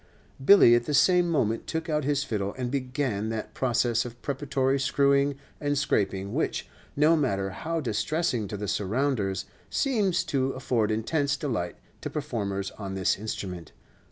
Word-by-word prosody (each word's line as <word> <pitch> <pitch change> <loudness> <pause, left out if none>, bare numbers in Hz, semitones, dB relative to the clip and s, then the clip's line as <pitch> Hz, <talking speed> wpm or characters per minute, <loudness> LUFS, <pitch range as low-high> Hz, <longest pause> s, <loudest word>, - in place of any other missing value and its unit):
Billy 165 -6 +8
at 120 0 +3
the 150 - +1
same 180 +3 +4
moment 115 -8 0
took 160 0 -3
out 150 -2 0
his 145 0 +1
fiddle 100 -6 -3
and 125 -1 -3
began 125 -5 -1
that 110 -1 -4
process 120 -2 +1
of 120 -1 -9
preparatory 135 -1 0
screwing 140 +1 +2 0.2
and 145 -1 0
scraping 100 -6 0
which, - - -1 0.3
no 150 +3 +5
matter 100 -10 0
how 165 - -3
distressing 125 - -1
to 105 - -5
the 105 +1 -4
surrounders, 105 -2 0 0.2
seems 215 -10 +1
to 135 -1 0
afford 120 -4 0
intense 140 +7 0
delight 110 -13 -2 0.3
to - - -4
performers 100 -10 -3
on 95 -2 -5
this 95 -1 +2
instrument. 95 -5 -6
130 Hz, 155 wpm, -27 LUFS, 105-145 Hz, 0.3 s, Billy